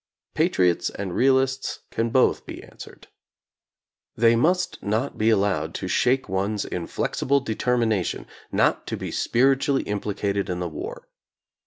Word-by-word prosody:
Pa -, -, +3 dB
triots 90 Hz, -1 st, +2 dB
and 95 Hz, -3 st, -5 dB
realists 130 Hz, 0 st, +1 dB
can 115 Hz, +1 st, -1 dB
both 130 Hz, +2 st, +2 dB
be -, -, -8 dB
answered. -, -, -13 dB, 1.1 s
They 115 Hz, +1 st, +4 dB
must 180 Hz, +9 st, +1 dB
not 110 Hz, +7 st, -1 dB
be 110 Hz, +1 st, +2 dB
allowed 95 Hz, -7 st, +1 dB
to 95 Hz, -, -4 dB
shake 130 Hz, +8 st, +2 dB
one's 100 Hz, +2 st, -1 dB
inflexible 130 Hz, +9 st, -1 dB
de 120 Hz, -5 st, -3 dB
termination 115 Hz, -5 st, 0 dB, 0.3 s
not -, -, +1 dB
to -, -, -3 dB
be -, -, -5 dB
spiritually 135 Hz, +2 st, +2 dB
implicated 100 Hz, -1 st, -2 dB
in 90 Hz, -1 st, -2 dB
the 90 Hz, -, -2 dB
war. 80 Hz, -, -7 dB
110 Hz, 140 wpm, -24 LUFS, 95-130 Hz, 1.1 s, They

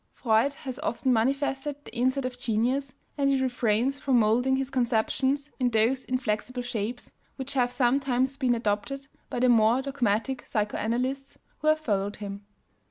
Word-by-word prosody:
Freud 230 Hz, +4 st, +2 dB
has 260 Hz, -1 st, -7 dB
often 285 Hz, -4 st, 0 dB
manifested 270 Hz, +4 st, 0 dB
the 225 Hz, -, -11 dB
insight 260 Hz, +2 st, +1 dB
of 255 Hz, -1 st, -3 dB
genius, 250 Hz, +3 st, 0 dB, 0.3 s
and 275 Hz, -1 st, +3 dB
he 275 Hz, -1 st, +2 dB
refrains 250 Hz, +1 st, +1 dB
from 265 Hz, -3 st, +2 dB
molding 240 Hz, +4 st, +3 dB
his 270 Hz, 0 st, -2 dB
conceptions 260 Hz, +3 st, 0 dB
in 250 Hz, -1 st, +2 dB
those 235 Hz, +3 st, +2 dB
inflexible 250 Hz, 0 st, -2 dB
shapes 240 Hz, 0 st, -4 dB, 0.2 s
which 270 Hz, 0 st, -5 dB
have 245 Hz, -2 st, +2 dB
sometimes 260 Hz, +1 st, +1 dB
been 255 Hz, -3 st, +1 dB
adopted 230 Hz, +5 st, -2 dB, 0.2 s
by -, -, -3 dB
the 255 Hz, -, +4 dB
more 230 Hz, +1 st, +5 dB
dogmatic 245 Hz, -2 st, -1 dB
psychoanalysts 245 Hz, +6 st, -2 dB, 0.2 s
who 305 Hz, -, -3 dB
have 310 Hz, 0 st, +4 dB
followed 205 Hz, -7 st, -1 dB
him. 200 Hz, -1 st, -7 dB
250 Hz, 155 wpm, -27 LUFS, 225-270 Hz, 0.3 s, more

